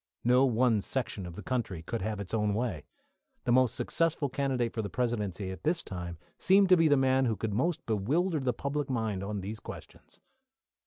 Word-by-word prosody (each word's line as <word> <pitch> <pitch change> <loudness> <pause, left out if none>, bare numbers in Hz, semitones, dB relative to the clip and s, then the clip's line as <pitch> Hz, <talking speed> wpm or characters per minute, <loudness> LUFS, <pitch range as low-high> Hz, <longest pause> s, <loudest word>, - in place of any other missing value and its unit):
No 125 +3 +5
one 120 -3 +3
section 105 -6 -3
of 85 - -9
the 105 - -8
country 100 -8 -2
could 115 +6 -3
have 105 +1 -2
its 100 0 -6
own 105 -2 +1
way. 110 - -2 0.6
The 120 - 0
most 130 -1 +4
successful 165 -4 0
candidate 130 -3 -1
for 110 - -1
the 100 - -4
Presidency 105 -4 -2
at 95 -2 -8
this 165 +2 +1
time 90 -2 -6 0.2
seemed 195 0 +5
to 185 - +8
be 165 -1 +5
the 145 -2 +5
man 130 0 +3
who 115 -3 +1
could 105 +1 -3
most 165 - 0
bewilder 150 - +1
the 130 -2 +1
public 140 +4 -3
mind 110 -6 -1
on 100 0 -3
these 105 +3 -5
questions. - - -11
120 Hz, 200 wpm, -30 LUFS, 105-135 Hz, 0.6 s, to